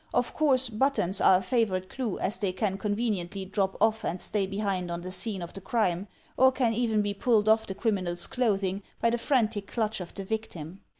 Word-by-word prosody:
Of 245 - +1
course 270 -4 +3
but 265 +5 +1
tons 185 -2 -1
are 185 - +7
a - - -2
favorite 185 -4 0
clue 235 -2 -3
as 205 - -1
they 200 -3 0
can 195 0 -1
conveniently 205 -3 -2
drop 195 0 -1
off 220 0 +2
and 180 - -2
stay 200 0 0
behind 195 -3 -2
on 170 0 -3
the 185 +1 -6
scene 190 0 -2
of 170 - -8
the 195 - -8
crime; 195 -4 0 0.3
or 260 0 +6
can 250 -3 +1
even 220 -2 +1
be 205 0 -1
pulled 215 0 +2
off 220 0 +4
the 190 - -4
criminal's 185 -6 0
clothing 200 -5 0 0.2
by 230 - +2
the 240 - 0
frantic 225 -6 +1
clutch 220 -3 -1
of 175 - -8
the 195 - -5
victim. 190 -5 -5
205 Hz, 215 wpm, -28 LUFS, 190-230 Hz, 0.3 s, are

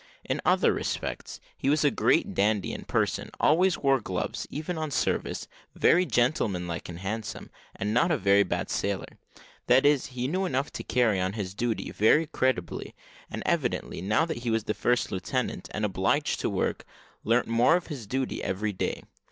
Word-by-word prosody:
In - - -2
other - - +4
respects - - -4 0.2
he 135 - -1
was 150 +2 +3
a 145 - +5
great - - +2
dandy 105 0 +1
in - - -5
his - - -12
person, - - 0
always 175 +4 +4
wore 135 -2 +2
gloves, 90 -3 -3
even 160 +4 -4
on 155 -1 -3
service, 140 - -1 0.3
very 180 +1 +4
gentlemanlike 100 - 0
and 85 - -7
handsome, 105 +2 -5 0.2
and 105 +2 -2
not 165 +9 +3
a 165 - +2
very 100 -3 +4
bad 95 - -1
sailor; - - -3 0.5
that 130 +3 +5
is, 145 -2 +3
he 125 -1 -3
knew 185 +6 0
enough 140 -2 -1
to - - -5
carry 110 -5 +2
on 95 +1 -1
his 100 -4 -4
duty 115 +1 -2
very 150 +10 +4
creditably, 130 - -2 0.3
and - - -5
evidently, - - -1
now 105 - +2
that 160 -5 -4
he 120 0 -3
was 110 -1 +1
the 105 - -1
first 120 +2 +1
lieutenant, 125 +7 -2
and 105 0 -1
obliged 95 +9 0
to - - 0
work, - - -1 0.4
learnt 120 +2 +2
more 115 +7 +4
of 180 - -1
his 135 -10 -7
duty 130 +3 -2
every 105 +2 -1
day. 95 - -3
120 Hz, 185 wpm, -27 LUFS, 100-145 Hz, 0.5 s, a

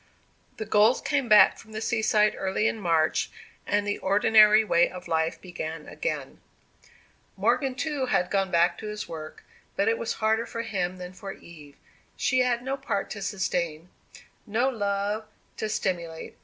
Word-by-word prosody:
The 220 - -4
Golds 215 +3 +4
came 275 -5 -1
back 210 -3 +7
from 220 - -14
the 215 - -4
seaside 220 -2 +2
early 195 +3 0
in 225 - -2
March, 165 -4 +1 0.4
and 205 0 +1
the 205 0 -2
ordinary 210 +2 +5
way 170 -4 +3
of 180 0 -10
life 160 0 0
began 165 -3 -7
again. 150 -2 -4 1.0
Morgan, 250 +6 +1
too, 280 -2 -2
had 180 -7 +1
gone 195 -1 +1
back 170 0 +2
to 215 - -6
his 210 0 -5
work, 155 -1 -8 0.3
but 200 - +1
it 225 0 +2
was 230 - -2
harder 220 +1 0
for 230 - -4
him 185 -5 -2
than 180 0 -8
for 195 +1 -8
Eve. 150 -4 -14 0.4
She 255 - +1
had 245 -1 +1
no 270 +2 -2
part 200 -6 -3
to 200 - -6
sustain 180 -4 -2 0.6
no 235 +5 +1
love 205 -2 -2 0.3
to 215 - -3
simulate. 170 -6 -3
205 Hz, 165 wpm, -26 LUFS, 175-220 Hz, 1.0 s, back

